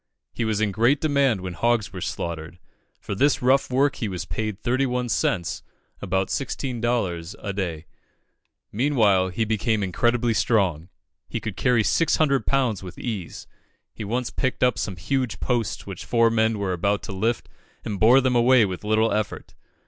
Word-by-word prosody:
He 115 - -2
was 110 -2 0
in 110 -2 +1
great 120 +8 +3
demand 140 -9 +2
when 90 -1 -5
hogs 115 +2 0
were - - -6
slaughtered. 85 0 -5 0.4
For - - -5
this 135 +6 +2
rough 135 +2 +3
work 135 +2 +2
he 110 - -2
was 90 -4 -4
paid 105 +3 -3
31 125 0 0
cents 85 -5 0 0.4
(about 95 0 -1
16d.) 120 -10 -2
a 100 - -5
day. 85 -5 -3 0.9
Meanwhile, 105 -7 +3
he 110 +5 -1
became 110 0 0
incredibly 120 +5 +1
strong. 95 -8 +1 0.4
He 115 - -3
could 110 -3 -5
carry 120 +2 +2
six 165 +9 +2
hundred 140 -4 +1
pounds 130 -7 +1
with 90 -2 -9
ease; 105 -8 -5 0.5
he - - -7
once 120 +4 -2
picked 130 -1 -1
up 125 -3 +2
some 95 - -3
huge 110 +5 -2
posts 120 -4 -1
which 95 -3 -7
four 115 -1 +3
men 110 -1 +2
were 100 -2 -1
about 100 +3 0
to 115 - -6
lift, 110 +5 -1 0.4
and 100 -2 -3
bore 125 +5 +6
them 130 -1 +1
away 120 -1 +5
with 95 -1 -5
little 110 +1 +2
effort. 105 -1 -3
110 Hz, 170 wpm, -24 LUFS, 95-125 Hz, 0.9 s, bore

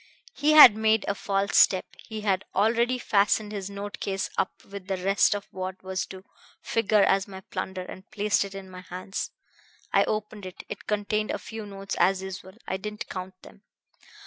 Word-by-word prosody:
He 300 +1 +2
had 275 -8 +11
made 220 0 +2
a - - +1
false 195 0 -1
step. 185 -1 +5
He 220 -2 -7
had 195 -3 +1
already 235 +5 +2
fastened 210 -1 +2
his 200 -2 -5
note 200 +1 -6
case 195 -1 -2
up 195 - -2
with 195 -1 -9
the 190 -1 -1
rest 195 +3 +3
of 205 - -6
what 185 0 -6
was 185 0 -3
to 190 0 -10 0.4
figure 215 -2 +2
as 195 0 +2
my 190 -1 -9
plunder, 190 0 -5
and 190 +1 -11
placed 210 -1 +1
it 200 0 -8
in 195 -1 -8
my 185 -1 -10
hands. 185 +2 -5 0.6
I - - +5
opened 210 -2 -3
it. 185 - -10
It - - -8
contained 210 0 0
a - - -1
few 220 -1 -8
notes 195 0 -5
as 190 0 +3
usual 190 0 -7
I 190 - -1
didn't 210 +2 -6
count 185 0 -6
them. 60 - -15
195 Hz, 190 wpm, -27 LUFS, 190-210 Hz, 0.6 s, had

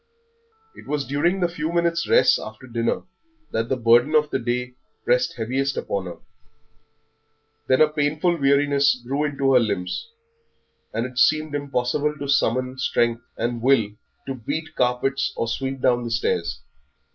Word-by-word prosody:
It - - -14
was 145 0 -1
during 170 +7 0
the 175 - +3
few 165 -2 -4
minutes' 170 -1 0
rest - - +5
after 110 +4 -9
dinner 115 -2 -1 0.5
that 115 +1 -1
the 130 - 0
burden 120 +5 +4
of 150 -1 +3
the - - 0
day 125 +1 -2 0.3
pressed 125 +1 +2
heaviest 130 +4 -1
upon 100 -2 -3
her; 85 - -8 1.5
then 130 +2 +3
a 155 - +7
painful 150 +3 0
weariness 140 0 +3
grew 140 +4 -1
into 140 -2 +1
her 125 - +7
limbs, 100 - -2 0.8
and 115 +2 -2
it 125 0 -5
seemed 155 +5 +3
impossible 145 +1 -1
to 140 -1 -5
summon 130 -1 +1
strength 120 -2 +1 0.2
and 120 0 -2
will 115 -5 +3 0.3
to 135 - -3
beat 145 +6 -5
carpets 125 +2 0
or 115 - -2
sweep 135 +3 -3
down 125 -1 +2
the 120 - -4
stairs. 70 - -1
130 Hz, 155 wpm, -23 LUFS, 120-145 Hz, 1.5 s, a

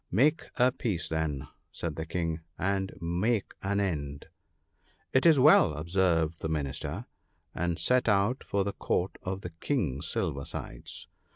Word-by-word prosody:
' - - -42
Make 145 - +3
a 125 +1 +4
peace 105 -9 -2
then/ 75 -4 -2 0.2
said 80 -3 -4
the 80 +1 -4
King, 80 -1 -1
• - - -15 0.2
and 95 0 0
make 95 +6 0
an 100 +1 0
end.' 70 -8 -2 0.4
' - - -39
It 130 +5 +5
is 160 -3 +7
well,' 130 - +6
observed 80 0 +1
the 80 - -3
Minister, 75 - -2 0.5
and 85 -1 -1
set 125 +4 +3
out 105 +5 +2
for 100 -1 0
the 100 +1 -2
Court 90 +2 -1
of 95 +1 -4
the 90 - -6
King 80 - -1
Silver 80 -3 -1
sides. - - -6
90 Hz, 165 wpm, -29 LUFS, 80-100 Hz, 0.5 s, is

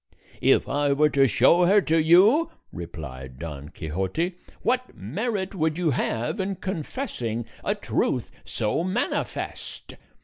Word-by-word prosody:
"If - - +4
I 145 0 +1
were 150 +2 +4
to 135 -1 +4
show 135 - +5
her 200 +4 +6
to 160 -2 +2
you," 205 - +5 0.2
replied 70 -7 -8
Don 75 -2 -7
Quixote, 95 - -2 0.3
"what 255 +1 0
merit 190 - -3
would 160 -3 0
you 175 -4 +1
have 120 - -1
in 195 +1 -1
confessing 155 - -4 0.2
a - - 0
truth - - -1
so 110 +10 -1
manifest? 190 +7 -3
155 Hz, 130 wpm, -25 LUFS, -, 0.3 s, her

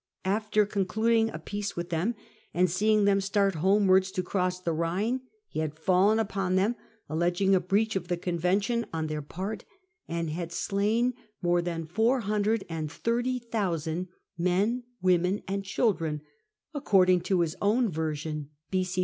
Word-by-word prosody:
After 210 +2 +2
concluding 220 +3 +1
a - - -6
peace 205 0 -4
with 175 0 -5
them, 180 +9 0 0.4
and 180 0 +3
seeing 210 +3 +3
them 200 -1 +3
start 195 0 +2
homewards 190 +2 +4
to 185 - -1
cross 180 0 -1
the 170 -2 -1
Ehine, 185 +10 0 0.3
he - - -5
had 155 -1 -2
fallen 190 +6 +3
upon 195 -4 0
them, 200 +6 +2 0.3
alleging 175 +5 +1
a 190 - +5
breach 205 +5 +1
of 190 - -2
the 175 - -1
convention 185 +7 0
on 160 -1 -2
their 155 -1 -3
part, 190 +8 -5 0.4
and 170 -1 -2
had 170 +1 -4
slain 215 +7 +1 0.3
more 175 0 +3
than 170 -2 -3
430,000 210 - -1 0.3
men, 195 +8 +1 0.2
women, 180 +2 +2
and 195 +1 -2
children, 175 - 0 0.5
according 185 - +4
to 185 -1 +1
his 160 -2 -1
own 225 +4 +3
version 155 -3 -3 0.2
[b.C. 185 -1 0
190 Hz, 140 wpm, -28 LUFS, 170-210 Hz, 0.5 s, a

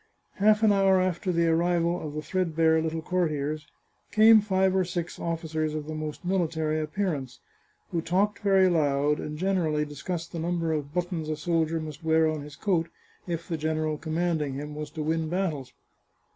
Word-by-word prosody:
Half 210 +2 +4
an 215 - +6
hour 195 -1 +4
after 185 0 0
the 170 -1 +2
arrival 170 +1 +1
of 150 -1 -6
the 155 - -3
threadbare 160 -1 +2
little 160 0 -3
courtiers, 155 -4 -1 0.4
came 220 +1 +7
five 190 -2 +1
or 190 - +3
six 175 -1 -4
officers 160 -2 -2
of 150 -1 -4
the 155 - -5
most 155 +2 -5
military 160 -4 0
ap 155 0 -6
pearance, 150 -11 -2 0.5
who 165 - 0
talked 200 +5 +1
very 195 -2 +4
loud, 150 -3 +2
and 150 0 -5
generally 165 -5 +1
discussed 165 +3 -5
the 170 - -5
number 165 -1 -1
of 145 -2 -3
buttons 175 -2 -2
a 155 - -2
soldier 165 0 0
must 155 -1 -7
wear 160 0 +3
on 155 -1 -2
his 145 0 -10
coat 170 -2 0 0.4
if 170 -1 -4
the 165 - -2
general 155 0 -1
commanding 160 -3 -1
him 150 +2 -6
was 150 0 -5
to 155 0 -5
win 160 +1 -1
battles. 160 -8 -2
165 Hz, 180 wpm, -27 LUFS, 155-180 Hz, 0.5 s, came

